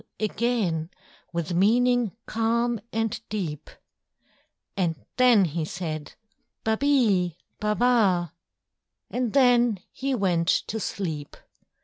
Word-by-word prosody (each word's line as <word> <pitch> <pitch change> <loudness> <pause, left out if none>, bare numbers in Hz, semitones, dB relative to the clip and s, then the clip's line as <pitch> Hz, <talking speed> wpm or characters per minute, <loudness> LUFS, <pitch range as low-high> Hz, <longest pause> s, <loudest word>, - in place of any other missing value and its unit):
_" - - -29 0.2
again 210 -7 0 0.4
With 170 0 -3
meaning 235 +4 +3
calm 230 +1 0
and 225 -1 -1
deep: 175 -9 -4 1.1
And 175 -4 0 0.2
then 245 -6 +6
he 165 0 -2
said, 155 -2 -5 0.5
"Ba 220 0 +2
be, 215 - +2 0.2
ba 210 0 0
ba!" 200 -9 +2 0.8
And 245 -3 -1
then 245 -5 +4
he 270 0 -2
went 175 -6 +1 0.2
to 220 - -4
sleep. 160 -9 -4
210 Hz, 105 wpm, -26 LUFS, 175-240 Hz, 1.1 s, then